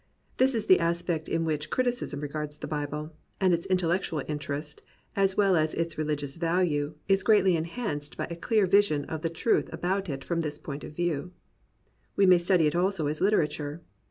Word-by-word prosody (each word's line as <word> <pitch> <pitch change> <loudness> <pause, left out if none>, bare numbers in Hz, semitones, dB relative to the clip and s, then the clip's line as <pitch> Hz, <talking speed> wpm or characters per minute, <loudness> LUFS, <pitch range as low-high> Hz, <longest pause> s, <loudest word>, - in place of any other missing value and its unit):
This 260 0 +3
is 220 -2 -1
the 185 - +6
aspect 170 -1 -1
in 165 0 0
which 155 -2 -2
criticism 245 - -1
regards 150 0 -4
the - - -6
Bible; 150 +1 -4 0.3
and 185 -3 +3
its 170 0 -1
intellectual 175 -4 0
interest, 150 0 -4 0.3
as 195 -1 +2
well 200 -3 +4
as 155 -1 +1
its 165 0 -1
reHgious 150 -1 -3
value, 165 -4 0
is 195 0 +3
greatly 195 -3 +4
enhanced 165 -3 -4
by - - -2
a - - -3
clear 215 +4 +2
vision 185 -7 +3
of 160 -1 -5
the 165 - -1
truth 165 +7 0
about 190 +1 -2
it 135 -2 -4
from 170 -1 -1
this 150 -2 -2
point 145 -1 -7
of 150 - -9
view. 175 0 -2 0.8
We 200 - +4
may 180 -2 +7
study 175 -1 +3
it 150 - +1
also 180 -2 +1
as 150 +1 -2
literature. 155 -5 0
165 Hz, 185 wpm, -28 LUFS, 150-190 Hz, 0.8 s, may